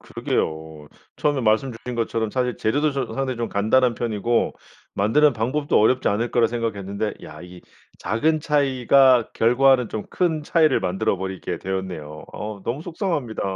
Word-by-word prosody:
그러게요. 80 -1 -4 0.3
처음에 145 -2 0
말씀 115 +3 +1
주신 125 +2 -7
것처럼 115 -1 -1
사실 125 -2 -1
재료도 145 +6 0
좀 135 - -2
상당히 130 -2 -2
좀 115 -1 -3
간단한 115 +4 +2
편이고 115 0 0 0.4
만드는 140 +9 +3
방법도 130 +6 0
어렵지 125 +4 +3
않을 115 +4 -1
거라 120 -2 +3
생각했는데 105 -3 -3
야 75 - -11
이게 90 0 -12 0.4
작은 155 +9 0
차이가 135 -4 +3
결과는 125 +1 +3
좀 110 - -5
큰 160 -4 0
차이를 155 -2 +2
만들어 95 +1 0
버리게 95 -2 -5
되었네요. 90 -6 -5
어우 105 -2 -7
너무 130 +6 -3
속상합니다. 165 - -3
115 Hz, 365 characters per minute, -22 LUFS, 100-135 Hz, 0.4 s, 만드는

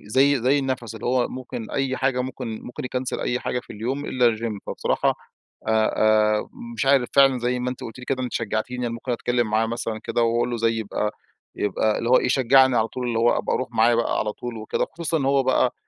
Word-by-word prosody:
زي 135 +2 +3
زي 135 +3 +3
النَفَس 130 -4 -3
اللي 110 +1 -6
هو 125 0 +2
ممكن 125 -3 -7
أي 135 -1 -1
حاجة 135 -1 0
ممكن 125 -3 -5
ممكن 125 - -7
يكنسل 125 0 -3
أي 125 +1 -1
حاجة 125 - -2
في - - -12
اليوم 125 +7 -3
إلا 120 -5 +2
الGym، 110 -2 -4
فبصراحة - - 0 0.5
آآ، - - +3 0.7
آآ، - - -15 0.3
مش 140 - -2
عارف 135 -3 +4
فعلًا 135 -2 +5
زي 125 +1 -1
ما 125 +1 -2
أنتِ 125 - -7
قلتِ 115 +2 -8
لي 125 - -8
كده، 130 -1 -2
أنتِ 125 - -4
شجعتيني، 120 +3 -2
أنا 115 - -3
ممكن 120 +2 -4
أتكلم 120 0 0
معاه 110 +1 +2
مثلًا 115 -1 -3
كده 120 - 0
وأقول 115 +1 +1
له 120 - -2
زي 115 0 +1
يبقى 105 -1 -2 0.4
يبقى 105 +1 0
اللي 115 +1 -2
هو 130 - +7
إيه - - 0
يشجعني 130 0 +4
على 110 0 +2
طول، 125 +1 -4
اللي 115 -1 0
هو 120 +1 +3
أبقى - - -1
أروح 130 - -2
معاه 115 0 +3
بقى 115 0 0
على 105 - -1
طول 120 0 -7
وكده، 110 0 -2
خصوصًا 165 0 -2
إن 135 - -2
هو 135 0 +3
بقى 130 -1 +2
125 Hz, 230 wpm, -23 LUFS, 115-130 Hz, 0.7 s, هو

